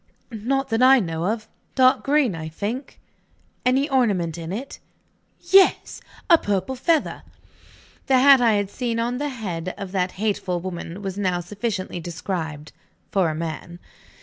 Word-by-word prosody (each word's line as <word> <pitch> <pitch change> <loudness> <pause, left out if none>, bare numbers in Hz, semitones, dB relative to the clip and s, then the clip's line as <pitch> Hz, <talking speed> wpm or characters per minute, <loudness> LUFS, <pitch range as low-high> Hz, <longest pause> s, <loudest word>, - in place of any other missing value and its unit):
"Not 265 +5 -1
that 225 +1 0
I 265 +1 +7
know 165 -3 -2
of. 215 +1 -2 0.3
Dark 255 -1 +4
green, 280 -6 +2
I 160 -1 -6
think." 215 - -5 0.6
"Any 265 +3 +2
ornament 205 - +1
in 165 0 -6
it?" 245 +8 -6 0.6
"Yes! 390 0 +3 0.3
A 335 -3 +6
purple 200 +4 -1
feather." 305 +4 0 0.9
The 265 - +4
hat 270 0 +7
I 230 -2 +4
had 205 -1 -1
seen 235 -2 -2
on 240 +2 -1
the 290 0 -2
head 185 -8 -5
of 195 -2 -6
that 185 -1 -1
hateful 195 -3 -1
woman 175 +1 -6
was 195 0 -4
now 185 -3 0
sufficiently 195 0 -4
described 165 -3 -5 0.4
for 190 -4 +2
a 155 - -3
man. 165 +1 -5
205 Hz, 150 wpm, -23 LUFS, 175-255 Hz, 0.9 s, I